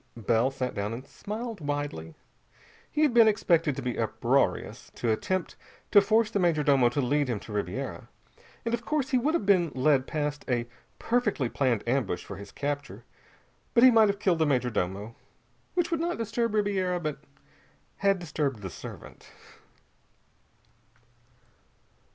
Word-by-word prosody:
Bell 115 +3 +2
sat 130 -2 -3
down 100 +1 -3
and 125 +4 -7
smiled 210 - -6
widely. 145 - -4 0.8
He 305 - +1
had 290 -5 +3
been 230 -2 +7
expected 170 -8 +2
to 135 - -5
be 125 -2 -3
uproarious, 110 -2 0
to 115 - 0
attempt 185 +11 -2 0.4
to 205 - +8
force 220 +2 +2
the 205 - 0
major 170 -4 +2
domo 135 -4 +4
to 130 +4 -1
lead 145 +3 +1
him 120 -4 -2
to 110 - -9
Ribiera. 105 -1 -4 0.6
And, 230 - -1
of 235 0 -1
course, 295 +1 -1
he 255 - +4
would 300 +7 +1
have 215 - -1
been 185 -4 +4
led 130 0 +3
past 150 -1 -2
a 120 -2 +1 0.3
perfectly 210 - 0
planned 120 -5 0
ambush 120 -8 -1
for 100 - -8
his 100 - -10
capture 145 0 -4 0.7
but 235 - +6
he 255 - +9
might 220 -2 +5
have 200 - 0
killed 185 -5 +1
the 160 - +3
major 125 -3 +1
domo. 100 +2 -3 0.6
Which 350 -2 0
would 335 - 0
not 345 +1 -1
disturb 230 0 -1
Ribiera, 190 -4 +1
but 155 -4 -4 0.8
had 195 0 +2
disturbed 150 - -3
the 95 - -5
servant. - - -11
150 Hz, 160 wpm, -28 LUFS, -, 0.8 s, he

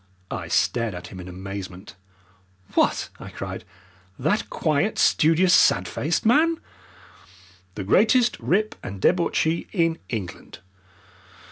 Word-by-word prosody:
I - - -4
stared 115 -5 0
at 90 - -8
him 95 - -10
in 90 - -9
amazement. 95 +1 -8 0.8
"What!" - - +1
I - - -9
cried, - - -7 0.5
"that 160 +11 0
quiet, 160 +7 0
studious, 165 +3 +4
sad - - +4
faced 160 +8 -2
man?" 315 +8 +4 1.2
"The 100 - -4
greatest 230 - +3
rip 215 +4 +1
and 100 -1 -7
debauchee 170 - +1
in 165 -4 +1
England! 105 -8 -6
160 Hz, 115 wpm, -24 LUFS, -, 1.2 s, studious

